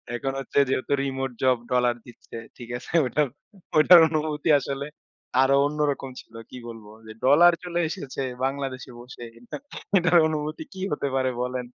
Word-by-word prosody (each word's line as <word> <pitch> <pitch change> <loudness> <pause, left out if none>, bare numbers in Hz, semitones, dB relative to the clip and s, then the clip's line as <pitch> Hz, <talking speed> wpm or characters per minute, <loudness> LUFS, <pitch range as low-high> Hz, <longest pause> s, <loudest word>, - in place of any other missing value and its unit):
এখন 135 +2 -3
হচ্ছে 135 - -1
যেহেতু 135 +1 -1
রিমোট 135 -1 -3
জব 130 -1 +4
ডলার 125 -1 +2
দিচ্ছে। 120 - -14 0.2
ঠিক 120 -2 -10
আছে? - - -11 0.9
ওইটার 170 +3 +8
অনুভূতি 155 0 -2
আসলে 140 +1 -4 0.6
আরো 135 +1 +4
অন্যরকম 145 -2 -1
ছিল। 115 - -27 0.2
কি - - -10
বলবো 110 -2 -11 0.2
যে 110 - -9
ডলার 170 +6 +6
চলে 175 -1 -3
এসেছে 140 -7 -6 0.2
বাংলাদেশে 135 -2 -4
বসে। 120 0 -11 0.7
এটার 175 -1 +4
অনুভূতি 155 0 -4
কি 190 - -8
হতে 145 - -1
পারে 130 -1 +1
বলেন? 125 0 -4
135 Hz, 150 wpm, -25 LUFS, 130-155 Hz, 0.9 s, ওইটার